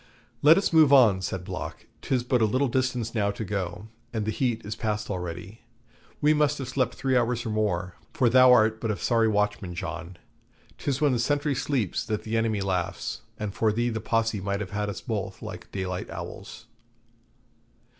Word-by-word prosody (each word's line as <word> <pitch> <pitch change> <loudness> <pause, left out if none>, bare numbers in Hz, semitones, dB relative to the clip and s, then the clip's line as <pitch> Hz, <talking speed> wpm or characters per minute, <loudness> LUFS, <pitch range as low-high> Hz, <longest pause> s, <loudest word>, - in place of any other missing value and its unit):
'Let 155 +3 +7
us 195 -3 0
move 155 -3 +6
on,' 115 -9 +6
said 95 0 -3
Block; 95 -1 -6 0.2
'tis 125 -2 0
but 125 -1 +1
a - - +5
little 130 +6 +1
distance 125 -2 -1
now 105 -3 +1
to 105 +2 -4
go, 100 +1 -4 0.2
and 110 -3 -2
the 110 - 0
heat 115 -2 -1
is 105 +2 -4
past 105 -2 -2
already. 90 +3 -6 0.6
We 150 +1 +5
must 150 -1 +2
have 135 - -5
slept 130 -2 0
three 135 -1 0
hours 120 0 +1
or 110 - -2
more, 95 -4 -1 0.2
for 130 - +2
thou 130 +1 +7
art 110 -2 +4
but 115 - -2
a 105 - -1
sorry 115 -2 +2
watchman, 105 -4 0
John. 85 +1 -6 0.6
'Tis 140 -1 -2
when 145 -2 +4
the 125 - +1
sentry 145 +4 +1
sleeps 125 - -1
that 105 -1 -2
the 110 +1 -3
enemy 110 -2 +1
laughs, 90 -3 -2 0.2
and 105 -2 -4
for 110 +1 +2
thee 120 +3 0
the 110 -2 -3
Posse 115 -2 0
might 100 +1 -2
have 100 -3 -5
had 105 0 -2
us 100 - -5
both - - -4
like - - -8
daylight 90 -2 -4
owls.' - - -8
110 Hz, 195 wpm, -26 LUFS, 100-125 Hz, 0.6 s, Let